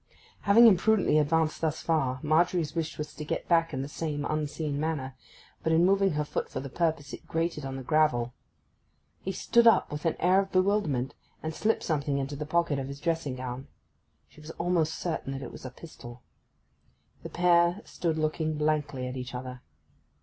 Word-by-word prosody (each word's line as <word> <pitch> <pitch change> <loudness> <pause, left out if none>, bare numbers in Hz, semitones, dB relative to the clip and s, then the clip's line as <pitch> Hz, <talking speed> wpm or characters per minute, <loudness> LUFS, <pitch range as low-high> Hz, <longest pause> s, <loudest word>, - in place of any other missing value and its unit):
Having 220 +4 +6
imprudently 205 -5 +4
advanced 155 +1 +1
thus 160 -1 -1
far, 135 -6 0
Margery's 160 0 +2
wish 165 -1 -3
was 150 -1 -5
to 150 - -7
get 150 - -3
back 165 -1 +4
again 140 - -5
in - - -1
the - - -5
same 145 -1 -3
unseen 150 -1 -2
manner; 145 -4 -2 0.5
but 160 - 0
in 165 +2 +4
moving 195 -1 +3
her 150 0 -1
foot - - -3
for - - -4
the 135 0 -7
purpose 160 -4 -1
it - - -9
grated 165 -3 -2
on 135 0 -5
the 135 - -6
gravel. 125 -5 +2 0.9
He 190 - -3
started 235 +5 +4
up - - +2
with 150 +1 -5
an 165 - +1
air 185 +2 +4
of 195 0 -2
bewilderment, 185 -9 +1 0.3
and 160 0 -3
slipped 220 +7 0
something 145 -3 0
into 140 +1 -3
the 150 +1 -5
pocket 170 -3 +1
of 135 - -4
his 140 0 -7
dressing 165 -4 -1
gown. 130 +1 -6 0.6
She 155 - -17
was 150 - -11
almost 170 -2 +1
certain 160 -5 -3
that 135 0 -5
it - - -7
was - - -11
a - - -4
pistol. 125 -4 -12 1.0
The - - -7
pair 175 +1 +3
stood 165 -2 -2
looking 155 0 -1
blankly 150 -3 0
at 125 - -5
each 125 0 -6
other. 125 0 -7
155 Hz, 195 wpm, -28 LUFS, 140-170 Hz, 1.0 s, Having